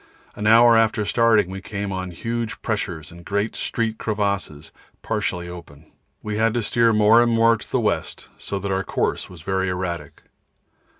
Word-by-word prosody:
An 105 - -2
hour 115 +1 +7
after 110 -1 +2
starting 110 -3 +3
we 95 0 -6
came 100 0 -5
on 95 -1 -4
huge 115 +6 -4
pressures 90 -8 -3
and 85 0 -13
great 100 +4 -2
street 115 -1 -2
crevasses 100 -8 -2 0.3
partly 85 -1 -2
open. 80 -3 -12 0.3
We 105 0 -3
had 115 +1 +2
to 120 - 0
steer 115 +2 +3
more 110 +2 +5
and 120 0 +2
more 115 0 +4
to - - -10
the - - +2
west, - - -2
so 100 - -5
that 100 0 -3
our 95 0 0
course - - -2
was 85 -4 -12
very 95 +1 -1
erratic. 85 -5 -5
100 Hz, 175 wpm, -22 LUFS, 90-115 Hz, 0.3 s, hour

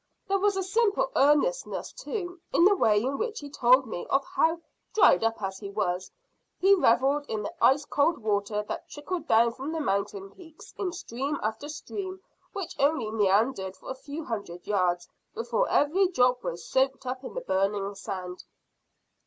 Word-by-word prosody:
There 395 0 +1
was 405 0 +2
a 385 - 0
simple 435 +4 +1
earnestness, 295 - +2
too, 385 -8 -5
in 340 - +4
the 405 +1 +6
way 215 - +3
in 270 +2 -2
which 455 -1 -2
he 285 -1 -9
told 255 0 +4
me 215 -6 -6
of 275 0 +2
how, 340 -2 +1 0.4
dried 225 - +6
up 225 0 0
as 190 0 -3
he 200 - -7
was, 185 -3 -2 0.5
he 390 +2 +5
revelled 280 -3 +3
in 215 -1 -2
the 330 - -5
ice 285 +3 +5
cold 305 +4 +2
water 210 -1 -1
that - - -6
trickled 340 +4 -5
down 230 +1 +4
from 270 +5 -5
the 325 - -2
mountain 200 -5 -2
peaks 325 - -15
in 375 -3 -2
stream 285 -4 -4
after 220 +7 -3
stream 375 +5 -6 0.3
which 385 -4 -5
only 275 -6 +2
meandered 200 -1 +1
for - - -8
a - - -1
few 285 +4 -7
hundred 200 -7 -5
yards 180 -4 0 0.3
before 230 0 0
every 355 +7 +3
drop 250 -7 +2
was 170 0 -5
soaked 265 0 +1
up 255 +1 -4
in - - -8
the - - -2
burning 200 - 0
sand." 185 -2 -6
265 Hz, 175 wpm, -27 LUFS, 210-340 Hz, 0.5 s, the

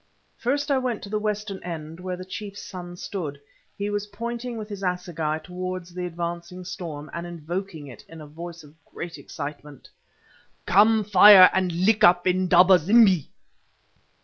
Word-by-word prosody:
First 285 +4 -1
I 270 - +3
went 250 -4 -3
to 200 - -8
the 215 +1 -1
western 210 -2 -3
end 165 -1 -7
where 180 0 -4
the 185 - -8
chief's 200 +2 -8
son 175 -2 -9
stood. 155 -8 -5 0.4
He 205 +1 -3
was 205 0 -3
pointing 235 +3 -5
with 215 -1 -6
his 205 -2 -8
assegai 175 -4 -2
towards 185 -1 -6
the 180 0 -4
advancing 170 +1 -6
storm, 160 -5 -7
and 170 +1 -5
invoking 175 0 -6
it 130 -4 -12
in 165 - -11
a 155 - -9
voice 165 +2 -9
of 150 +2 -19
great 170 0 -8
excitement. 145 -2 -9 0.8
"Come, 215 +3 +4
fire, 200 -1 +8
and 185 -1 +1
lick 190 +6 +2
up 175 0 +5
Indaba 185 0 +5
zimbi! 195 - +4
180 Hz, 160 wpm, -24 LUFS, 170-205 Hz, 0.8 s, fire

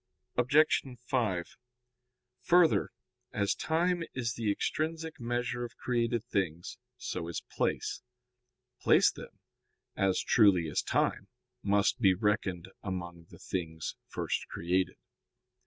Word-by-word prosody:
Obj. 140 +6 +4 0.2
5: 110 -10 -1 0.8
Further, 175 -2 +4 0.4
as 100 -1 +1
time 170 +2 +1
is 120 -3 -1
the 110 -3 0
extrinsic 160 +7 -2
measure 120 0 -2
of 120 - -7
created 120 -2 0
things, 95 -2 -2 0.2
so 90 -8 -4
is 85 - -4
place. - - -1 0.8
Place, - - +5
then, - - -11 0.6
as 95 -1 +2
truly 95 -7 +4
as - - +1
time, - - 0 0.3
must 100 +4 +2
be 95 -5 +5
reckoned 95 -3 0
among 85 -3 -5
the - - -13
things 80 -4 -4
first - - -2
created. 90 +2 0
105 Hz, 110 wpm, -31 LUFS, 90-125 Hz, 0.8 s, Place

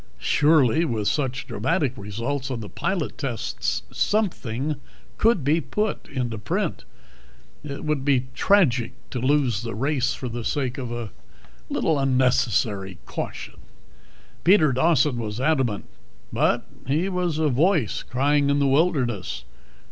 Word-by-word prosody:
Surely 150 0 +4
with 110 -10 -1
such 130 -3 -1
dramatic 130 -4 0
results 120 +7 -3
on 130 -3 -3
the 105 -2 -7
pilot 185 -6 -2
tests 130 -6 -2
something 150 - -1 0.4
could 225 - +3
be 155 +5 +2
put 210 - -2
into 120 -5 -3
print. 105 - -2 0.8
It 140 0 -6
would 150 -3 0
be 135 -3 +2
tragic 130 - +3 0.2
to 125 - -3
lose 130 -4 +2
the 115 -3 -5
race 135 +3 0
for 130 - -5
the 120 0 -4
sake 130 +1 -1
of 125 -3 -4
a 120 -3 -5 0.6
little 155 -3 +1
unnecessary 125 -8 +1
caution.... - - -6 0.9
Peter 170 -5 +5
Dawson 150 -2 +3
was 110 0 -4
adamant, 130 -7 +1 0.5
but - - +2 0.2
he 155 +7 +1
was 180 -4 -1
a 155 -1 +2
voice 150 - +2
crying 140 +3 +1
in 140 - +3
the 140 - +2
wilderness. 135 - +1
135 Hz, 135 wpm, -24 LUFS, 120-155 Hz, 0.9 s, Peter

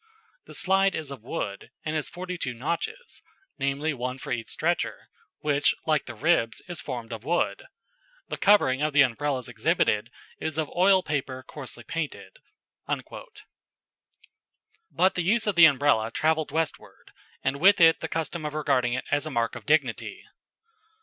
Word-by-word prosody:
The - - -6
slide 195 0 +3
is 155 -3 -4
of 135 -5 -8
wood, 100 -2 -5 0.2
and 155 0 -2
has 155 - -1
forty 180 +1 -6
two 130 -8 -4
notches, 170 - -4 0.4
namely, 140 +3 0
one 125 0 -4
for - - -8
each 115 -2 -2
stretcher, 170 +2 -2 0.3
which 145 -1 +2
like 155 -3 +1
the 120 - -7
ribs, 125 -3 +1
is 175 -3 -5
formed 120 -1 -6
of 110 -1 -7
wood. 175 - 0 0.6
The - - -4
covering 150 -10 +4
of 155 0 0
the 145 -1 +7
Umbrellas 135 0 -1
exhibited - - +1 0.3
is 160 -1 -3
of 155 -2 -1
oiled 185 +1 +4
paper 135 -3 -3
coarsely 130 -5 -8
painted." 165 - -5 2.5
But 185 +1 +3
the 180 - -1
use 215 +6 +2
of 210 - +1
the 170 -2 +8
Umbrella 140 -7 +3
travelled 155 +5 +1
westward, 160 +1 -4 0.3
and 135 +1 0
with 200 +4 +6
it 165 -1 +6
the 165 - -3
custom 165 0 -3
of 150 0 -4
regarding 125 -5 +1
it 130 - -3
as 145 +2 +1
a - - -3
mark 115 -5 0
of - - -10
dignity. 145 -6 0
150 Hz, 160 wpm, -26 LUFS, 130-170 Hz, 2.5 s, the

